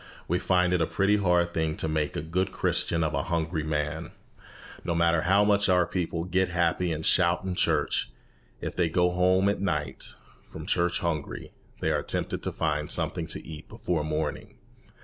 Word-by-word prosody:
We 90 +2 +1
find 90 -2 +2
it 90 - +2
a 80 - +2
pretty 100 +2 +2
hard 90 -3 +2
thing 80 -1 -1
to - - -1
make 75 -1 -1
a - - -3
good 90 +4 -1
Christian 85 -1 +1
of 80 -1 -1
a 70 - +1
hungry 80 0 -1
man. 75 -1 -3 0.7
No 85 -2 -1
matter 85 -1 +3
how 95 +4 +4
much 100 -1 +3
our 90 -1 +4
people 85 -2 -2
"get 90 +1 +1
happy" 85 0 +1
and 80 0 -3
"shout" 90 -1 +3
in 95 -1 -2
church, 90 - +1 0.5
if - - -4
they 85 -2 +1
go 90 +2 +2
home 95 +2 +3
at 100 - 0
night 75 -7 -3 0.3
from - - -9
church 90 +1 +1
hungry, 80 -4 -3 0.3
they - - +1
are - - +1
tempted - - -1
to - - -3
find - - -1
something - - 0
to - - -4
eat 80 -2 -9
before 85 -4 -2
morning. 75 +1 -3
85 Hz, 190 wpm, -27 LUFS, 80-90 Hz, 0.7 s, how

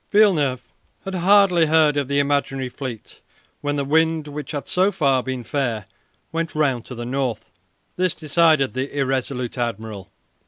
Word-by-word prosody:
Villeneuve 160 - +3 0.4
had 195 - -4
hardly 185 -2 +4
heard 155 -1 +4
of 140 -2 0
the 140 +1 0
imaginary 140 -2 0
fleet 125 -4 -8 0.4
when 145 0 -1
the 140 -1 -1
wind, 160 +1 +2
which 145 0 -7
had 145 -2 -5
so 190 +2 +2
far 135 -8 +2
been 130 -1 -4
fair, 115 -5 -2 0.5
went 165 0 -3
round 135 -6 +1
to 125 - -8
the 120 0 -6
north. 125 -5 -3 0.5
This 180 -3 +1
decided 155 -3 +2
the 135 +3 -4
irresolute 130 -2 -2
admiral. 110 -4 -4
140 Hz, 155 wpm, -22 LUFS, 130-160 Hz, 0.5 s, hardly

